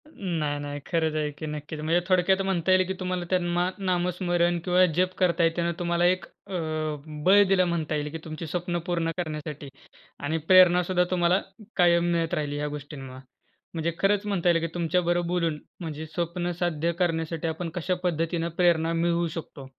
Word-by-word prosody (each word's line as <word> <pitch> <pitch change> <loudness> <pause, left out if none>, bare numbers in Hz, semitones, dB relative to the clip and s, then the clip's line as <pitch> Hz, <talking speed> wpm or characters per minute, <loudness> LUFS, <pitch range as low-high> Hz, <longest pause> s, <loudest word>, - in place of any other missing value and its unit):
नाही, 155 -6 -2
नाही. 145 0 -5
खरच 160 -3 0
आहे, 150 -1 0
की 150 +2 -8
नक्कीच. 150 +1 -6
म्हणजे 160 +3 +2
थोडक्यात 190 +1 +3
म्हणता 190 -2 0
येईल, 185 0 +5
की 190 - -1
तुम्हाला 180 -1 -2
त्यांना 175 0 +1
नामस्मरण 175 -2 +1
किंवा 180 0 +5
जप 185 +1 +2
करत 180 -1 +2
आहेत, 165 0 +4
तेव्हा 170 0 +1
तुम्हाला 170 0 +1
एक 185 +1 +2
अ, - - -14 0.7
बळ 200 +2 +7
दिलं 185 -1 +4
म्हणता 160 -3 -1
येईल. 150 0 -2
की 165 - -4
तुमची 160 +1 -6
स्वप्नं 175 +1 -2
पूर्ण 170 -2 0
करण्यासाठी 150 -4 -5 0.5
आणि 155 +3 -1
प्रेरणासुद्धा 180 -1 +6
तुम्हाला 180 +1 +3 0.3
कायम 175 -1 +4
मिळत 165 -1 0
राहिली 145 -1 -1
या 150 - -2
गोष्टींमुळे. 140 -3 -8 0.5
म्हणजे 165 0 -1
खरच 205 +1 +2
म्हणता 185 -4 +1
येईल, 165 -1 +4
की 165 - -1
तुमच्याबरोबर 175 0 +1
बोलून 170 -3 0 0.2
म्हणजे 160 -3 -5
स्वप्न 175 +2 -2
साध्य 170 -1 0
करण्यासाठी 165 -1 -1
आपण 165 +1 -3
कशा 180 +1 -1
पद्धतीनं 165 0 0
प्रेरणा 165 -2 +3
मिळवू 170 +1 +1
शकतो. 150 -4 -7
170 Hz, 170 wpm, -26 LUFS, 160-180 Hz, 0.7 s, बळ